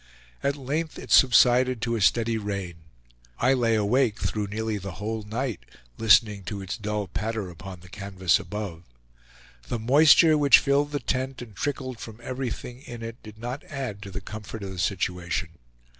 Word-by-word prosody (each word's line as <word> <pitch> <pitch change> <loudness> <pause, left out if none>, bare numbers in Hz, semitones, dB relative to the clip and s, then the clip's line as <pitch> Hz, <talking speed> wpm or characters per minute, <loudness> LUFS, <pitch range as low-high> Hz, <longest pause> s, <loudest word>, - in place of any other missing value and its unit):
At 140 0 0
length 150 +4 -3
it - - -9
subsided 125 0 +5
to 115 0 0
a 110 - -2
steady 115 +2 +2
rain. 100 -4 -4 0.6
I 125 +3 +3
lay 115 -3 +2
awake 110 +2 +2
through 105 -2 -2
nearly 110 +1 -2
the 100 -1 -6
whole 110 +3 -4
night, 115 +3 -3 0.4
listening 105 -1 +5
to 100 +3 -4
its 95 -1 -4
dull 105 -1 -3
patter 110 -3 -3
upon 90 +2 -10
the 90 - -14
canvas 95 -2 0
above. 90 -1 -6 0.9
The - - -2
moisture, 150 +6 +6
which 140 -1 +8
filled 145 +1 +1
the 145 - -1
tent 130 0 -2
and 110 -4 -13
trickled 130 -4 -3
from 110 0 -9
everything 125 -1 -5
in 120 -4 -9
it, 115 +1 -7
did 110 0 -12
not 120 +5 -5
add 130 -8 -5
to 100 - -8
the 100 +1 -6
comfort 105 +1 -8
of 95 - -5
the 95 - -7
situation. 90 0 -1
110 Hz, 175 wpm, -26 LUFS, 100-130 Hz, 0.9 s, which